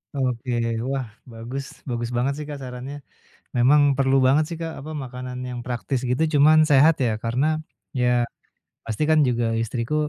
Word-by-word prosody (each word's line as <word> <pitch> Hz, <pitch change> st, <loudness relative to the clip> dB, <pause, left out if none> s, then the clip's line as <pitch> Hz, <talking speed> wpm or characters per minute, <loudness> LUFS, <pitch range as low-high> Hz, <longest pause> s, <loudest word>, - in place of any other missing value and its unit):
Oke. 125 Hz, -2 st, -2 dB, 0.4 s
Wah, 135 Hz, -2 st, -1 dB, 0.3 s
bagus. 120 Hz, +5 st, -6 dB, 0.2 s
Bagus 120 Hz, -1 st, -2 dB
banget 130 Hz, +3 st, +1 dB
sih, 150 Hz, -, -5 dB
Kak, 145 Hz, -, -5 dB
sarannya. 130 Hz, +2 st, -7 dB, 0.6 s
Memang 140 Hz, +5 st, +5 dB, 0.2 s
perlu 135 Hz, 0 st, +3 dB
banget 145 Hz, +4 st, +4 dB
sih, 170 Hz, -, -4 dB
Kak, 165 Hz, -1 st, -5 dB
apa, 150 Hz, +3 st, -8 dB
makanan 125 Hz, 0 st, -7 dB
yang 125 Hz, -1 st, -5 dB
praktis 125 Hz, +1 st, -2 dB
gitu 125 Hz, +5 st, +1 dB, 0.2 s
cuman 155 Hz, +2 st, +6 dB
sehat 145 Hz, +4 st, +6 dB
ya. 120 Hz, -, +2 dB
Karena 125 Hz, +5 st, +1 dB, 0.5 s
ya 125 Hz, -, +3 dB, 0.8 s
pasti 115 Hz, +4 st, -3 dB
kan 155 Hz, -, +5 dB
juga 120 Hz, -1 st, 0 dB, 0.2 s
istriku, 115 Hz, +4 st, -3 dB
130 Hz, 160 wpm, -23 LUFS, 120-140 Hz, 0.8 s, cuman